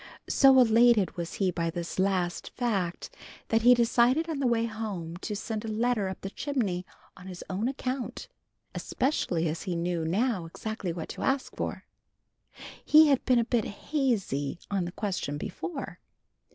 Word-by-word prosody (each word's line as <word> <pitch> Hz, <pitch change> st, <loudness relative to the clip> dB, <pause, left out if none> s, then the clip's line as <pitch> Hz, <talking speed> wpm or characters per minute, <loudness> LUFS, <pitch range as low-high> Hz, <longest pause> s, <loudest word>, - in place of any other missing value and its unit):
So 270 Hz, -1 st, +6 dB
elated 230 Hz, -5 st, +5 dB
was 170 Hz, -1 st, -5 dB
he 190 Hz, -2 st, +1 dB
by 170 Hz, -1 st, -1 dB
this 170 Hz, +2 st, -5 dB
last 185 Hz, -3 st, 0 dB
fact, 195 Hz, -8 st, -2 dB, 0.3 s
that 225 Hz, 0 st, +3 dB
he 245 Hz, +2 st, +7 dB
decided 240 Hz, +6 st, +3 dB
on 315 Hz, -4 st, -3 dB
the 270 Hz, -, +2 dB
way 230 Hz, -1 st, +2 dB
home 210 Hz, -7 st, -5 dB
to 210 Hz, +3 st, -4 dB
send 215 Hz, +1 st, -4 dB
a -, -, -5 dB
letter 220 Hz, -2 st, 0 dB
up 190 Hz, -, -7 dB
the 195 Hz, -, -5 dB
chimney 205 Hz, -12 st, -2 dB, 0.3 s
on 185 Hz, -1 st, -12 dB
his 180 Hz, -1 st, -8 dB
own 200 Hz, +5 st, -1 dB
account, 260 Hz, -, -4 dB, 0.5 s
especially 175 Hz, -, -1 dB
as 160 Hz, +2 st, -3 dB
he 180 Hz, -, -3 dB
knew 170 Hz, 0 st, -1 dB
now 190 Hz, +1 st, 0 dB
exactly 200 Hz, +1 st, -4 dB
what 165 Hz, -1 st, -6 dB
to -, -, -7 dB
ask 270 Hz, 0 st, -1 dB
for. -, -, -4 dB, 1.0 s
He 310 Hz, 0 st, +7 dB
had 275 Hz, -3 st, +3 dB
been 255 Hz, -2 st, +4 dB
a 235 Hz, -, +3 dB
bit 235 Hz, -3 st, +1 dB
hazy 205 Hz, -, -1 dB
on 195 Hz, -3 st, 0 dB
the 175 Hz, -, -5 dB
question 185 Hz, -8 st, -3 dB
before. 305 Hz, -, -6 dB
215 Hz, 165 wpm, -28 LUFS, 180-245 Hz, 1.0 s, he